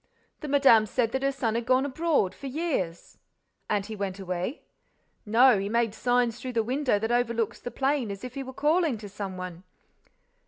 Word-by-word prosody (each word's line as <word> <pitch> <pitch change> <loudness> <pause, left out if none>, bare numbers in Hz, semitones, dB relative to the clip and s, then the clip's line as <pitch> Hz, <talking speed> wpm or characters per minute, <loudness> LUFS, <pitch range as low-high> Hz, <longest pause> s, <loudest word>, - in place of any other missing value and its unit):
"The 305 - -6
madame 270 -6 +5
said 230 +1 0
that 265 +1 -1
her 275 0 +1
son 250 -5 -1
had 235 0 -2
gone 255 +1 +3
abroad—for 285 - 0
years." 265 - -3 0.5
"And 205 -2 0
he 220 - -6
went 195 -2 -3
away?" 185 +6 -4 0.6
"No, 235 0 +6
he 200 +1 -3
made 230 -1 +1
signs 245 0 +1
through 255 0 -5
the 225 -1 +1
window 255 0 +1
that 225 +3 -2
overlooks 235 -2 0
the - - -6
plain—as 260 -8 -1
if 250 -1 -6
he 275 - -4
were 260 -1 -7
calling 300 0 +1
to 210 -1 -9
some 195 -1 -6
one." 180 -1 -7
235 Hz, 185 wpm, -27 LUFS, 205-270 Hz, 0.6 s, No